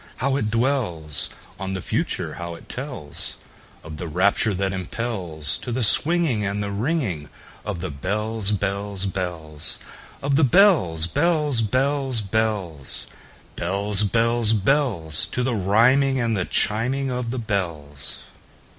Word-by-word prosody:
How 135 +2 0
it 120 -6 0
dwellsOn 95 - -2
the - - -3
Future! - - -2
how 85 -1 -6
it - - -14
tellsOf 125 - -5 0.6
the 85 - -5
rapture 100 +5 +2
that 95 +1 0
impelsTo 95 - -3
the 125 +1 0
swinging 150 -1 +5
and 100 +1 -1
the 100 - -3
ringingOf 105 - -1 0.5
the 95 - -3
bells, 105 +7 -1
bells, 100 -1 -1
bells, 85 -6 -4 0.5
Of 140 0 +2
the 160 - +4
bells, 130 - +5
bells, 150 - +1
bells, 130 +2 +1
bells, 95 -8 -2 0.5
Bells, 100 +3 +2
bells, 115 +1 +2
bells—To 110 - +1
the 130 0 0
rhyming 125 +7 +3
and 115 -2 +1
the 90 -3 0
chiming 130 +5 0
of 125 -1 -2
the 130 - -3
bells! 85 - -4
105 Hz, 120 wpm, -23 LUFS, 90-125 Hz, 0.6 s, swinging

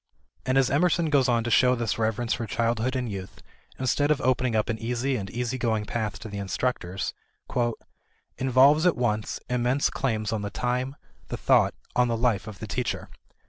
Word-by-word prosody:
And 130 +1 +2
as 130 -2 +3
Emerson 165 +2 +2
goes 135 -3 +4
on 115 -1 +2
to 120 - -2
show 125 +2 +5
this 115 -2 -2
reverence 110 +1 0
for 115 - -3
childhood 115 +3 0
and 125 -1 -1
youth 95 -3 -7 0.3
instead 140 +3 +1
of 150 - +3
opening 125 -1 +1
up 110 - +1
an 110 -1 -2
easy 125 +3 -1
and 100 -5 -4
easy 125 +3 -3
going 110 -3 0
path 105 -2 -3
to 110 - -6
the 100 -1 -6
instructors, 95 -2 -2 1.3
"involves 135 +6 +5
at 175 - +2
once, 110 -3 -1
immense 125 +3 +1
claims 110 -5 -1
on 110 - -1
the 100 - -3
time, 125 +5 -2 0.3
the - - -4
thought, - - +3 0.2
on 125 0 +4
the 115 -1 0
life 115 -4 +1
of 105 -3 -8
the 110 - -6
teacher. 120 +4 -3
120 Hz, 185 wpm, -26 LUFS, 110-130 Hz, 1.3 s, show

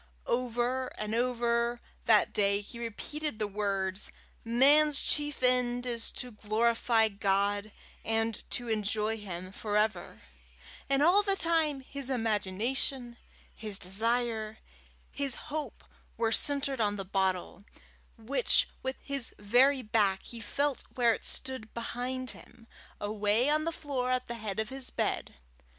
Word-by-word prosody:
Over 245 +1 0
and 215 0 -3
over 235 0 +1 0.3
that 220 -2 +4
day 200 0 +3
he 235 +3 -9
repeated 235 +4 -4
the 215 - -1
words, 195 -1 -2 0.3
"Man's 280 +5 +5
chief 295 -3 -1
end 250 -1 +4
is 235 -2 0
to 250 - -5
glorify 225 +1 +2
God, 200 0 0 0.3
and 225 0 0
to 245 - -4
enjoy 215 0 0
Him 185 -2 -7
for 205 +1 -2
ever," 215 +1 -1 0.7
and 275 +1 +3
all 360 +6 +6
the 395 -1 +1
time 320 -6 +2
his 275 0 -5
imagination, 235 +2 -1 0.4
his 210 -3 -1
desire, 220 +3 0 0.5
his 275 -3 0
hope, 305 0 -6 0.3
were 225 -1 +1
centred 280 -1 +2
on 205 -1 +1
the 195 -1 -5
bottle, 190 0 -1 0.5
which 250 - +2
with 260 0 -2
his 275 -4 -2
very 255 +6 +4
back 210 -3 +1
he 235 - -6
felt 280 +6 -1
where 240 -2 +4
it - - -6
stood 260 -4 -4
behind 250 +2 -3
him, 240 -1 -14 0.3
away 210 +4 +1
on 310 +1 +2
the 330 - 0
floor 275 -6 -3
at 255 0 0
the 235 - -5
head 215 -3 -4
of 220 -1 -1
his 265 -1 -4
bed. - - -2
235 Hz, 135 wpm, -30 LUFS, 210-260 Hz, 0.7 s, all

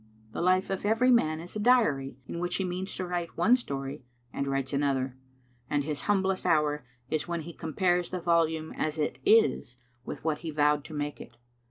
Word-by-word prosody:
The - - -4
life 185 +2 +2
of 190 - -2
every 225 +5 +3
man 155 -10 +3
is 175 +4 -8
a - - -2
diary 205 - +3
in 170 - -5
which 175 0 -1
he 195 - 0
means 185 +1 -3
to 185 - -3
write 175 -1 -4
one 240 +3 +5
story, 140 - -5 0.3
and 140 - -2
writes 135 0 -1
another; 135 -2 0 0.5
and 145 -1 +1
his 150 0 -2
humblest 190 -2 +2
hour 150 -1 +2 0.3
is 155 +1 -1
when 170 -1 -2
he 170 +2 -8
compares 175 +2 0
the 185 - -3
volume 165 -2 +1
as 155 0 -2
it 150 - -1
is 145 - +3 0.3
with - - -7
what 155 -2 0
he 165 - -5
vowed 150 -1 +2
to 155 - -8
make 145 0 -3
it. 120 - -12
160 Hz, 200 wpm, -29 LUFS, 145-185 Hz, 0.5 s, one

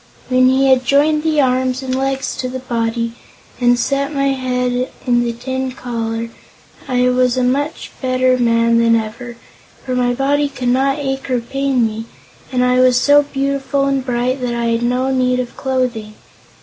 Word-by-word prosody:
When 255 0 +4
he 265 +1 +3
had 260 -1 +4
joined 290 +4 +3
the 310 -1 +1
arms 255 0 0
and 260 -1 -3
legs 270 0 -2
to 255 - -3
the 260 - -5
body, 230 -2 -2 0.5
and 245 -1 +3
set 275 +3 -1
my 275 -1 0
head 250 -1 -1 0.2
in 240 -2 +2
the 235 - -1
tin 260 +2 -4
collar, 230 -2 -4 0.6
I 250 -1 +2
was 250 0 +2
a 255 - +1
much 285 +5 -1
better 255 -1 +2
man 230 -1 +3
than 230 0 +4
ever, 235 +2 -4 0.5
for 255 - -3
my 245 -1 +1
body 285 +2 +1
could 255 -3 -3
not 270 +3 +2
ache 270 -2 -4
or 250 -1 +1
pain 265 0 0
me, 220 0 -4 0.5
and 250 -1 +1
I 250 0 +2
was 255 -1 +4
so 290 +2 +5
beautiful 275 0 -1
and 275 -1 0
bright 250 +1 -1
that 245 -1 -2
I 235 0 -1
had 230 0 0
no 250 +2 0
need 250 -1 +1
of 245 -1 -5
clothing. 250 -5 -2
255 Hz, 180 wpm, -17 LUFS, 240-270 Hz, 0.6 s, so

